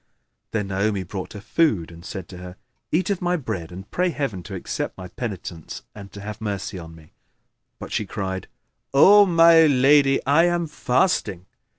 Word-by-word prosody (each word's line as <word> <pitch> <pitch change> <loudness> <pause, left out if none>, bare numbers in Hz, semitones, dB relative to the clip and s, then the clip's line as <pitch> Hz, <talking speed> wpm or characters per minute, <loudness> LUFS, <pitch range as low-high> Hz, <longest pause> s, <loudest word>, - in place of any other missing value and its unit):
Then 105 -3 -3
Naomi 100 0 -1
brought 95 +1 -7
her 105 - -8
food 100 - 0
and 85 0 -13
said 95 -4 -7
to 90 - -10
her, 90 0 -9 0.4
"Eat 185 +4 +1
of 195 - -2
my 180 0 +1
bread 100 - -5
and 95 +3 -9
pray 180 +1 +1
Heaven 140 - -3
to 95 +2 -8
accept 90 - -4
my 90 -1 -8
penitence 90 -7 -7
and 100 -1 -11
to 100 - -10
have 105 +1 -7
mercy 100 -2 -4
on 80 -1 -11
me." 80 -1 -18 0.7
But - - -9
she 105 - -2
cried, 95 -1 -4 0.5
"O 200 +8 +7
my 165 -2 +6
lady, 135 0 +4
I 150 +5 +4
am 175 -1 0
fasting. 125 - 0
105 Hz, 180 wpm, -23 LUFS, 95-155 Hz, 0.7 s, O